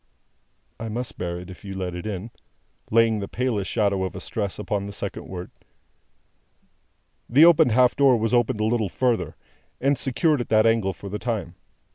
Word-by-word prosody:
"I 115 - -5
must 120 +3 -5
bear 85 -1 -3
it, 90 +1 -10
if 90 - -13
you 95 -1 -7
let 90 -2 -3
it 90 +4 -6
in." 105 +2 -5 0.6
(Laying 115 -1 +3
the 100 - -4
palest 120 -6 -2
shadow 100 -4 +1
of 95 - -4
a - - -5
stress 100 -4 -3
upon 105 -1 -3
the 100 - -7
second - - -4
word.) 90 -1 -7 1.8
The 145 +7 +7
opened 160 -7 +6
half 125 +1 +4
door 135 -3 +5
was 110 +1 -1
opened 120 -3 +2
a - - +2
little 110 -3 0
further, 100 -9 0 0.4
and 140 0 +1
secured 140 +2 +1
at - - -6
that 110 0 +4
angle 115 -4 +2
for 100 - -10
the 105 +2 -4
time. 110 -8 -3
110 Hz, 185 wpm, -24 LUFS, 95-120 Hz, 1.8 s, The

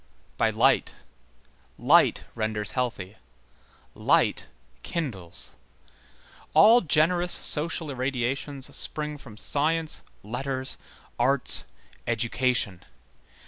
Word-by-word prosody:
By - - +2
light. - - +1 0.7
Light - - +4
renders 110 -2 -2
healthy. 110 -6 -3 0.8
Light - - +1 0.3
kindles. 95 - -2 1.0
All 220 +10 +7
generous 175 +2 +2
social 160 0 +2
irradiations 130 +1 -3
spring 150 -1 -2
from 110 -6 -13
science, 155 +5 -1 0.2
letters, 130 +4 -3 0.4
arts, 130 +2 +2 0.4
education. 120 -4 0
130 Hz, 75 wpm, -26 LUFS, 115-150 Hz, 1.0 s, All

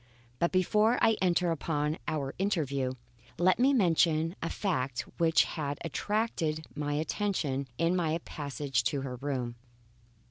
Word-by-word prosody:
But 170 - +2
before 210 +5 +3
I 225 -1 +4
enter 180 -1 +2
upon 150 -1 -1
our 140 -3 -2
interview, 140 -10 0 0.4
let 185 +4 +3
me 265 +3 +5
mention 165 - +3
a 165 - -2
fact 135 - -1 0.2
which 165 -1 +5
had 145 -3 -3
attracted 165 -5 -1
my 145 -1 -2
attention 150 -4 -1
in 170 +2 +2
my 165 -3 +1
passage 140 -2 -2
to 140 - 0
her 130 -2 -5
room. 125 -3 -3
160 Hz, 135 wpm, -30 LUFS, 140-185 Hz, 0.4 s, me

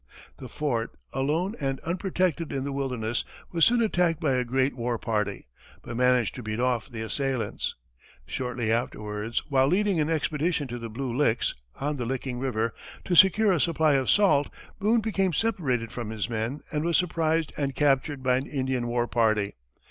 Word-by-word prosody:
The - - -9
fort, 120 -7 -2 0.2
alone 155 +9 0
and 135 -1 -1
unprotected 175 -2 -1
in 135 -1 -2
the 140 - -3
wilderness, 125 -4 -2 0.3
was 165 -2 +4
soon 240 0 +4
attacked 175 -6 +1
by 150 -5 +1
a 125 -1 +1
great 130 +2 0
war 120 -1 -1
party, 105 - -2 0.4
but 120 - -6
managed 125 -2 +3
to 125 - -7
beat 110 0 -4
off 125 -1 0
the 115 -3 -5
assailants. 135 +1 -2 0.5
Shortly 125 -3 -2
afterwards, 105 -1 -2
while 135 -1 +4
leading 195 +1 +2
an 150 0 +1
expedition 155 -1 0
to 120 0 -5
the 115 0 -6
Blue 120 +2 -4
Licks, 125 -4 +2 0.3
on 145 +1 -1
the 120 -2 -3
Licking 130 -1 -3
river, 115 -4 -1 0.3
to 180 - -1
secure 195 +4 +6
a 175 - +2
supply 160 -3 +3
of 135 -2 +1
salt, 190 -9 +4 0.3
Boone 220 +3 +3
became 195 -4 0
separated 135 - 0
from 120 -3 -5
his 110 -2 -2
men, 115 +6 -2
and 150 -1 -1
was 170 0 +3
surprised 165 -3 0
and 140 -2 -2
captured 140 -1 +1
by 125 -1 +3
an 135 - -3
Indian 130 -3 -1
war 120 0 0
party. 110 -4 +1
135 Hz, 180 wpm, -27 LUFS, 120-160 Hz, 0.5 s, secure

